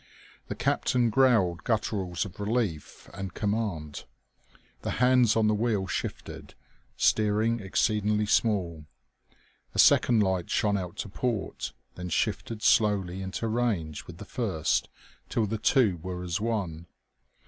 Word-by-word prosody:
The -, -, -4 dB
captain 120 Hz, -2 st, +1 dB
growled 105 Hz, -10 st, +3 dB
gutturals 100 Hz, -5 st, -1 dB
of 100 Hz, -, -11 dB
relief 105 Hz, -7 st, -2 dB
and 95 Hz, -2 st, -6 dB
command. 100 Hz, -9 st, -2 dB, 0.8 s
The -, -, -3 dB
hands 125 Hz, -2 st, +4 dB
on 110 Hz, -1 st, +3 dB
the 110 Hz, -, +3 dB
wheel 105 Hz, -2 st, 0 dB
shifted, -, -, -5 dB, 0.4 s
steering 110 Hz, +2 st, +2 dB
exceeding 105 Hz, +1 st, +1 dB
small. 90 Hz, -8 st, 0 dB, 0.9 s
A -, -, -4 dB
second 115 Hz, -3 st, +5 dB
light 95 Hz, -3 st, -1 dB
shone 105 Hz, -1 st, +1 dB
out 90 Hz, -3 st, -4 dB
to -, -, -4 dB
port, 110 Hz, 0 st, -3 dB, 0.2 s
then 90 Hz, 0 st, -6 dB
shifted 110 Hz, +5 st, -2 dB
slowly 100 Hz, -5 st, +2 dB
into 95 Hz, +4 st, -3 dB
range 110 Hz, -10 st, -1 dB
with 85 Hz, -, -10 dB
the 105 Hz, -, -9 dB
first, 100 Hz, -, -1 dB, 0.4 s
till 115 Hz, -, +1 dB
the 110 Hz, +1 st, -3 dB
two 110 Hz, -5 st, +3 dB
were 90 Hz, +2 st, -6 dB
as 90 Hz, +3 st, -2 dB
one. 95 Hz, -8 st, -3 dB
105 Hz, 130 wpm, -28 LUFS, 90-115 Hz, 0.9 s, second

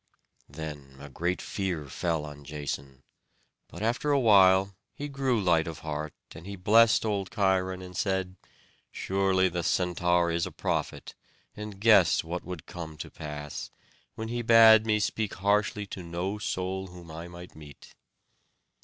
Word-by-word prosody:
Then 70 Hz, -3 st, -8 dB
a 70 Hz, +1 st, -10 dB
great 85 Hz, +6 st, -2 dB
fear 90 Hz, -7 st, -3 dB
fell 80 Hz, +2 st, -2 dB
on 75 Hz, -1 st, -10 dB
Jason; 70 Hz, -2 st, -6 dB, 0.6 s
but -, -, -8 dB
after 120 Hz, +6 st, 0 dB
a 140 Hz, -1 st, +4 dB
while 95 Hz, -4 st, +5 dB, 0.2 s
he 145 Hz, -, -5 dB
grew 135 Hz, -4 st, 0 dB
light 85 Hz, -4 st, +2 dB
of 80 Hz, -, -7 dB
heart; 75 Hz, -1 st, -4 dB, 0.2 s
and 85 Hz, +4 st, -11 dB
he 100 Hz, -, -6 dB
blessed 110 Hz, +5 st, +4 dB
old 100 Hz, -3 st, -1 dB
Cheiron, 95 Hz, -3 st, 0 dB
and 90 Hz, 0 st, -10 dB
said: 95 Hz, -1 st, -1 dB, 0.6 s
"Surely 95 Hz, -1 st, +1 dB
the 90 Hz, -1 st, -2 dB
Centaur 90 Hz, 0 st, +1 dB
is 85 Hz, +2 st, 0 dB
a -, -, -8 dB
prophet, -, -, -3 dB, 0.4 s
and 105 Hz, -2 st, -8 dB
guessed 105 Hz, -6 st, +5 dB
what 85 Hz, +2 st, -5 dB
would 90 Hz, -4 st, -7 dB
come 80 Hz, -3 st, -8 dB
to 80 Hz, -, -8 dB
pass, 75 Hz, -2 st, -7 dB, 0.5 s
when 110 Hz, 0 st, -5 dB
he 120 Hz, +1 st, -2 dB
bade 115 Hz, -1 st, +7 dB
me 105 Hz, -1 st, +2 dB
speak 105 Hz, 0 st, -2 dB
harshly 105 Hz, +2 st, +1 dB
to 95 Hz, -, -8 dB
no 90 Hz, +4 st, -4 dB
soul 95 Hz, -1 st, -3 dB
whom 90 Hz, -2 st, -12 dB
I 85 Hz, +2 st, -7 dB
might 85 Hz, 0 st, -11 dB
meet." 75 Hz, -2 st, -14 dB
90 Hz, 155 wpm, -28 LUFS, 80-105 Hz, 0.6 s, bade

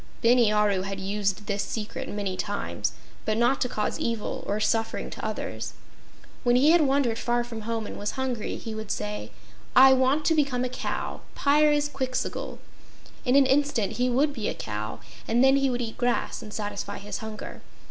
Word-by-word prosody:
Bini 235 Hz, -2 st, +5 dB
Aru 210 Hz, -3 st, +3 dB
had 195 Hz, 0 st, -4 dB
used 200 Hz, +1 st, -1 dB
this 200 Hz, -1 st, -1 dB
secret 210 Hz, +1 st, -4 dB
many 200 Hz, -2 st, -2 dB
times, 205 Hz, +2 st, -2 dB, 0.3 s
but 215 Hz, 0 st, 0 dB
not 240 Hz, +3 st, +3 dB
to 250 Hz, -, +1 dB
cause 210 Hz, -, -2 dB
evil 230 Hz, -2 st, -2 dB
or 205 Hz, +1 st, 0 dB
suffering 225 Hz, +1 st, 0 dB
to -, -, -8 dB
others. -, -, -4 dB, 0.7 s
When 245 Hz, -1 st, +4 dB
he 280 Hz, +5 st, +6 dB
had 345 Hz, 0 st, +6 dB
wandered 270 Hz, -5 st, +2 dB
far 240 Hz, 0 st, +1 dB
from 235 Hz, -2 st, -7 dB
home 225 Hz, -1 st, -1 dB
and -, -, -7 dB
was 205 Hz, -, -2 dB
hungry, 255 Hz, -4 st, -2 dB
he 225 Hz, -, -6 dB
would 220 Hz, -1 st, -6 dB
say: 105 Hz, +1 st, -3 dB, 0.5 s
"I 265 Hz, +1 st, +9 dB
want 265 Hz, +4 st, +2 dB
to 325 Hz, -, +4 dB
become 275 Hz, -5 st, +1 dB
a -, -, -2 dB
cow -, -, -4 dB
Pyrzqxgl!" 290 Hz, -3 st, +1 dB, 0.7 s
In 250 Hz, +1 st, +3 dB
an 280 Hz, -1 st, +7 dB
instant 270 Hz, -5 st, +1 dB
he 250 Hz, +1 st, +2 dB
would 280 Hz, +4 st, +2 dB
be 225 Hz, -6 st, -3 dB
a -, -, -3 dB
cow, 105 Hz, 0 st, -5 dB, 0.3 s
and 235 Hz, +3 st, +3 dB
then 270 Hz, +1 st, +6 dB
he 275 Hz, -1 st, +2 dB
would 245 Hz, -1 st, -1 dB
eat 225 Hz, -1 st, -6 dB
grass 245 Hz, -1 st, 0 dB
and 215 Hz, -, -9 dB
satisfy 205 Hz, -1 st, -4 dB
his 205 Hz, +1 st, -5 dB
hunger. 220 Hz, -1 st, -7 dB
235 Hz, 185 wpm, -27 LUFS, 210-265 Hz, 0.7 s, I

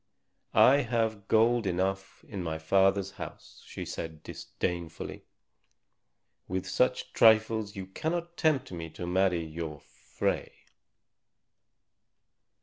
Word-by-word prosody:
"I 135 Hz, +3 st, +7 dB
have 115 Hz, -6 st, -1 dB
gold 115 Hz, 0 st, +3 dB
enough 95 Hz, +1 st, -2 dB
in 100 Hz, -3 st, -5 dB
my 80 Hz, -2 st, -3 dB
father's 95 Hz, +4 st, +2 dB
house," -, -, -9 dB
she -, -, -6 dB
said 80 Hz, -1 st, -6 dB
disdainfully. 85 Hz, -2 st, -5 dB, 1.2 s
"With 95 Hz, 0 st, -3 dB
such 125 Hz, 0 st, +1 dB
trifles 110 Hz, -2 st, +4 dB
you 95 Hz, -1 st, -5 dB
cannot 170 Hz, -, -3 dB
tempt 155 Hz, -, +1 dB
me 85 Hz, -2 st, -5 dB
to 85 Hz, -, -7 dB
marry 90 Hz, -1 st, +1 dB
your 80 Hz, -1 st, -6 dB
Frey." -, -, -3 dB
95 Hz, 105 wpm, -29 LUFS, 85-115 Hz, 1.2 s, I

